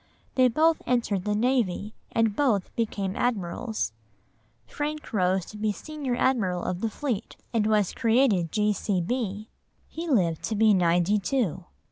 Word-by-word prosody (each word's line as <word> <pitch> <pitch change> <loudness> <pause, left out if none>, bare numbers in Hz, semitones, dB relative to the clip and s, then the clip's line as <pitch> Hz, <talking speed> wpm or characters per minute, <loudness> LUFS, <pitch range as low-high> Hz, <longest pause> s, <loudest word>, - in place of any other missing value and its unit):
They 255 -1 +5
both 315 +6 +3
entered 230 -6 0
the 210 0 +1
navy, 215 -3 0 0.2
and 225 -2 +1
both 225 -9 +1
became 200 -4 -2
admirals. 220 - -2 0.7
Frank 295 - -5
rose 185 -2 +1
to 210 - -10
be 215 0 0
Senior 280 +3 -4
Admiral 210 -9 +1
of 180 +1 -3
the 225 - 0
Fleet, 235 -2 -4 0.2
and 220 -2 +2
was 210 -3 +2
created 225 - +2
G.C.B.; 210 +1 -1 0.4
he 335 +2 -6
lived 180 - +2
to 220 - -2
be 215 0 +5
ninety 180 +2 +3
two. 195 - -1
215 Hz, 140 wpm, -26 LUFS, 190-250 Hz, 0.7 s, They